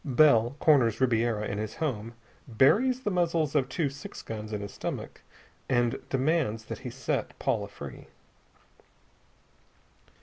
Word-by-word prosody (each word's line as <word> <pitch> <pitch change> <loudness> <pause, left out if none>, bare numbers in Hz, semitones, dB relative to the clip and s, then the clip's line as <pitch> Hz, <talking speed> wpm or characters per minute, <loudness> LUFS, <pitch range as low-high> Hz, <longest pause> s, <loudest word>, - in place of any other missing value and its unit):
Bell 130 -4 +4
corners 130 -8 +4
Ribiera 115 -4 +1
in 100 - -3
his 110 0 -4
home, 115 -7 -3 0.3
buries 215 - +3
the 210 - -1
muzzles 165 -4 +1
of 135 -4 +1
two 165 -5 0
six 140 0 -8
guns 110 -1 -6
in 105 -1 -3
his 100 -1 -7
stomach, - - -5 0.5
and 120 -2 +2
demands 135 -5 0
that - - -6
he 130 - -6
set 125 0 -3
Paula - - -1
free. - - -10
130 Hz, 135 wpm, -28 LUFS, 115-155 Hz, 0.5 s, Bell